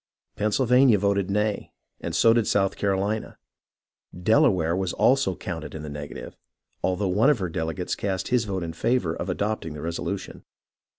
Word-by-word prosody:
Pennsylvania 125 Hz, +3 st, +4 dB
voted 100 Hz, -1 st, 0 dB
nay, 105 Hz, +1 st, -1 dB, 0.3 s
and -, -, -4 dB
so 115 Hz, -, +5 dB
did 115 Hz, -2 st, +1 dB
South 95 Hz, -1 st, +1 dB
Carolina. 100 Hz, +2 st, -1 dB, 0.8 s
Delaware 90 Hz, -4 st, +3 dB
also 95 Hz, +7 st, +2 dB
was -, -, -14 dB
counted 80 Hz, -4 st, -6 dB
in 80 Hz, -, -6 dB
the 75 Hz, -, -6 dB
negative, 75 Hz, 0 st, -8 dB, 0.5 s
although 95 Hz, +2 st, 0 dB
one 105 Hz, +9 st, +3 dB
of 150 Hz, -, +4 dB
her 95 Hz, -4 st, -3 dB
delegates 80 Hz, +2 st, -3 dB
cast 95 Hz, -2 st, -2 dB
his 120 Hz, -2 st, +2 dB
vote 95 Hz, -3 st, -3 dB
in 80 Hz, -1 st, -5 dB
favour 105 Hz, -1 st, 0 dB
of 90 Hz, -, -5 dB
adopting 100 Hz, -4 st, -2 dB
the 75 Hz, -, -7 dB
resolution. 90 Hz, +4 st, -4 dB
95 Hz, 160 wpm, -25 LUFS, 85-110 Hz, 0.8 s, so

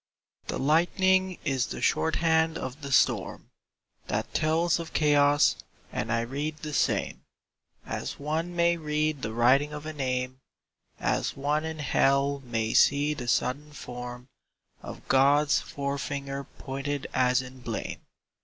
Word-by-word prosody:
The -, -, -2 dB
lightning 185 Hz, +5 st, +2 dB
is 135 Hz, -4 st, +1 dB
the -, -, -6 dB
shorthand 160 Hz, 0 st, +2 dB
of 130 Hz, +4 st, -6 dB
the 140 Hz, -1 st, -6 dB
storm -, -, +1 dB, 0.6 s
That -, -, -2 dB
tells 160 Hz, +2 st, +2 dB
of 165 Hz, -, -7 dB
chaos; 145 Hz, -1 st, +4 dB, 0.4 s
and 115 Hz, -, -2 dB
I 115 Hz, 0 st, +2 dB
read 145 Hz, +6 st, -3 dB
the 155 Hz, -1 st, -7 dB
same -, -, 0 dB, 0.6 s
As -, -, -4 dB
one 160 Hz, +4 st, -3 dB
may 170 Hz, 0 st, +3 dB
read 150 Hz, -2 st, -1 dB
the 110 Hz, -, -3 dB
writing 130 Hz, +6 st, +3 dB
of 150 Hz, 0 st, -7 dB
a 155 Hz, -, -5 dB
name, 130 Hz, -2 st, -2 dB, 0.6 s
As -, -, -1 dB
one 150 Hz, +3 st, 0 dB
in 160 Hz, 0 st, -4 dB
Hell 140 Hz, -1 st, +2 dB
may 115 Hz, -2 st, -2 dB
see 145 Hz, +1 st, +4 dB
the 125 Hz, -5 st, -6 dB
sudden 145 Hz, +5 st, 0 dB
form 125 Hz, -2 st, -8 dB, 0.5 s
Of -, -, -10 dB
God's 140 Hz, +2 st, +4 dB
fore 140 Hz, 0 st, -4 dB
finger 140 Hz, 0 st, -4 dB
pointed 140 Hz, +1 st, -5 dB
as 125 Hz, 0 st, +3 dB
in 130 Hz, +1 st, -11 dB
blame. 115 Hz, -3 st, -5 dB
145 Hz, 140 wpm, -27 LUFS, 130-155 Hz, 0.6 s, chaos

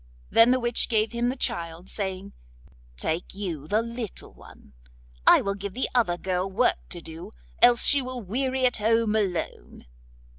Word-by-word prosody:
Then 230 Hz, +1 st, +6 dB
the 255 Hz, +1 st, +3 dB
witch 240 Hz, -1 st, +1 dB
gave 220 Hz, -2 st, +1 dB
him 240 Hz, +1 st, 0 dB
the 255 Hz, -, -2 dB
child, 170 Hz, -6 st, -3 dB
saying: 195 Hz, -1 st, -5 dB, 0.6 s
'Take 160 Hz, -, -3 dB
you 170 Hz, -8 st, -5 dB
the 215 Hz, +6 st, +1 dB
little 230 Hz, -2 st, -6 dB
one; 70 Hz, -, -17 dB, 0.5 s
I -, -, +8 dB
will 200 Hz, -, -1 dB
give 200 Hz, 0 st, -7 dB
the 260 Hz, -, 0 dB
other 225 Hz, -9 st, +2 dB
girl 185 Hz, +1 st, -2 dB
work 230 Hz, +6 st, +1 dB
to 175 Hz, -, -5 dB
do, 165 Hz, +1 st, -9 dB, 0.3 s
else 240 Hz, -1 st, +6 dB
she 280 Hz, -, +4 dB
will 255 Hz, -1 st, -5 dB
weary 260 Hz, +6 st, -1 dB
at 250 Hz, -, +2 dB
home 225 Hz, 0 st, +1 dB
alone. 190 Hz, -6 st, -3 dB
210 Hz, 165 wpm, -26 LUFS, 180-240 Hz, 0.6 s, I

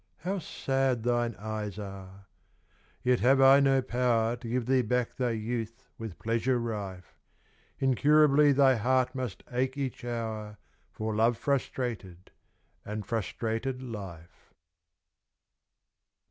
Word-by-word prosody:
How 190 Hz, +4 st, -2 dB
sad 135 Hz, -6 st, -1 dB
thine 120 Hz, -1 st, 0 dB
eyes 105 Hz, -1 st, -5 dB
are! 100 Hz, -1 st, -9 dB, 0.8 s
Yet 125 Hz, -1 st, +3 dB
have 135 Hz, +3 st, +4 dB
I 135 Hz, +1 st, +8 dB
no 135 Hz, -1 st, +3 dB
power 120 Hz, -2 st, +1 dB
To 120 Hz, -1 st, -8 dB
give 125 Hz, 0 st, -1 dB
thee 130 Hz, +1 st, +3 dB
back 125 Hz, +1 st, -1 dB
thy 125 Hz, -2 st, 0 dB
youth 115 Hz, +1 st, -4 dB
with 110 Hz, -5 st, -7 dB
pleasure 115 Hz, +3 st, 0 dB
rife; 100 Hz, -6 st, -5 dB, 0.6 s
Incurably 145 Hz, +2 st, +4 dB
thy 135 Hz, -2 st, +4 dB
heart 130 Hz, +3 st, +1 dB
must 130 Hz, -6 st, -5 dB
ache 130 Hz, +2 st, -1 dB
each 135 Hz, -4 st, -4 dB
hour 110 Hz, -3 st, -4 dB, 0.3 s
For 110 Hz, 0 st, -3 dB
love 115 Hz, +2 st, +3 dB
frustrated 120 Hz, -9 st, -3 dB, 0.5 s
and 105 Hz, 0 st, -5 dB
frustrated 115 Hz, +3 st, -3 dB
life. 95 Hz, -8 st, -9 dB
120 Hz, 120 wpm, -29 LUFS, 110-130 Hz, 0.8 s, I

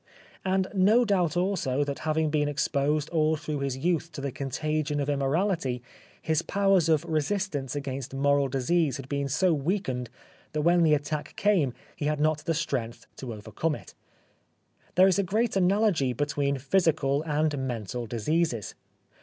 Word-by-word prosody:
And 190 Hz, 0 st, +1 dB
no 210 Hz, +5 st, +4 dB
doubt 180 Hz, -6 st, +1 dB
also 170 Hz, -8 st, 0 dB
that 140 Hz, -1 st, -4 dB
having 155 Hz, 0 st, +1 dB
been 150 Hz, -1 st, +1 dB
exposed 145 Hz, +1 st, 0 dB
all 160 Hz, -1 st, +2 dB
through 150 Hz, -1 st, -4 dB
his 135 Hz, -2 st, -2 dB
youth 170 Hz, +2 st, 0 dB
to -, -, -6 dB
the 140 Hz, -1 st, -3 dB
contagion 150 Hz, +2 st, -2 dB
of 145 Hz, 0 st, 0 dB
im 140 Hz, -, -1 dB
morality 140 Hz, -4 st, 0 dB, 0.4 s
his 160 Hz, 0 st, 0 dB
powers 195 Hz, -3 st, +2 dB
of 155 Hz, -2 st, +3 dB
resistance 155 Hz, -3 st, -1 dB
against 135 Hz, -2 st, -4 dB
moral 140 Hz, +1 st, +2 dB
disease 140 Hz, +3 st, +1 dB
had 135 Hz, -1 st, -8 dB
been 140 Hz, 0 st, -2 dB
so 170 Hz, +5 st, +2 dB
weakened 140 Hz, -, -2 dB, 0.4 s
that 150 Hz, -, 0 dB
when 175 Hz, +1 st, +4 dB
the 155 Hz, -2 st, +5 dB
attack 150 Hz, +1 st, -4 dB
came 180 Hz, -, +2 dB, 0.2 s
he 145 Hz, -, -4 dB
had 150 Hz, 0 st, 0 dB
not 155 Hz, 0 st, +2 dB
the 165 Hz, -, 0 dB
strength 125 Hz, -7 st, -3 dB
to 130 Hz, -3 st, -6 dB
over 110 Hz, 0 st, -9 dB
come 160 Hz, +6 st, 0 dB
it. -, -, -12 dB, 1.0 s
There 185 Hz, +1 st, +7 dB
is 195 Hz, 0 st, +3 dB
a -, -, +3 dB
great 215 Hz, +5 st, 0 dB
analogy 190 Hz, -, +2 dB
between 140 Hz, +1 st, -1 dB
physical 145 Hz, -1 st, +1 dB
and 155 Hz, -1 st, 0 dB
mental 120 Hz, 0 st, -4 dB
diseases. 120 Hz, -, -1 dB
150 Hz, 165 wpm, -27 LUFS, 135-170 Hz, 1.0 s, There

